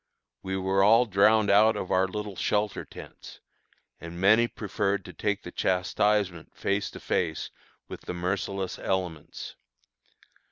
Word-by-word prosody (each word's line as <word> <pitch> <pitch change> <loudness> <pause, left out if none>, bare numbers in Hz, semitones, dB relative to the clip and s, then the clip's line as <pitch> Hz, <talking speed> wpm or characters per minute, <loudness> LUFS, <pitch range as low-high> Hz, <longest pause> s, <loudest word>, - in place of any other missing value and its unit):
We 95 0 -3
were 95 +1 +2
all 115 +4 +6
drowned 105 +1 +4
out 110 +2 +5
of 95 - -4
our 95 +1 +3
little 105 0 -5
shelter 105 +1 -1
tents, - - -12 0.6
and 85 +1 -8
many 110 +5 +5
preferred 100 -3 -2
to 90 - -10
take 105 +5 -2
the 90 - -8
chastisement 95 0 0
face 100 0 -1
to - - -10
face 80 -3 -2 0.4
with - - -8
the - - -6
merciless 95 +1 -3
elements. 90 -5 -4
100 Hz, 135 wpm, -27 LUFS, 90-105 Hz, 0.6 s, all